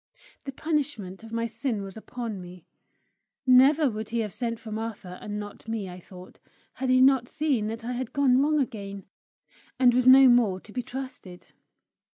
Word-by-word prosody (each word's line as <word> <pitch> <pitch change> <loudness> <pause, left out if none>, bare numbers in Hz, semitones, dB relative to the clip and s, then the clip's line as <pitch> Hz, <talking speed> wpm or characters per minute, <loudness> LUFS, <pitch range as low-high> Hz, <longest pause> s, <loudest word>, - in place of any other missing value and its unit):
The 275 - -4
punishment 265 - -3
of 225 - -11
my 230 0 -1
sin 230 -1 -3
was 195 -1 -9
upon 225 -2 -6
me. 180 -1 -12 0.8
Never 275 +4 +6
would 215 -3 -4
he 235 0 -1
have 210 -4 -4
sent 230 -2 -3
for 220 -1 -10
Martha 215 -4 -6
and 210 0 -5
not 205 +1 -9
me, 225 -3 -3
I 180 0 -9
thought, 180 0 -14 0.3
had 265 - -3
he 255 0 +5
not 260 -2 +4
seen 280 -9 0
that 225 +1 -6
I 245 - -3
had 250 -1 -4
gone 270 -2 +3
wrong 300 +1 +2
again, 200 -7 -4 0.7
and 250 -2 +5
was 250 +1 +2
no 265 +1 +9
more 235 -7 +4
to 210 - -16
be 250 - -2
trusted. 245 -8 -8
230 Hz, 180 wpm, -26 LUFS, 205-260 Hz, 0.8 s, no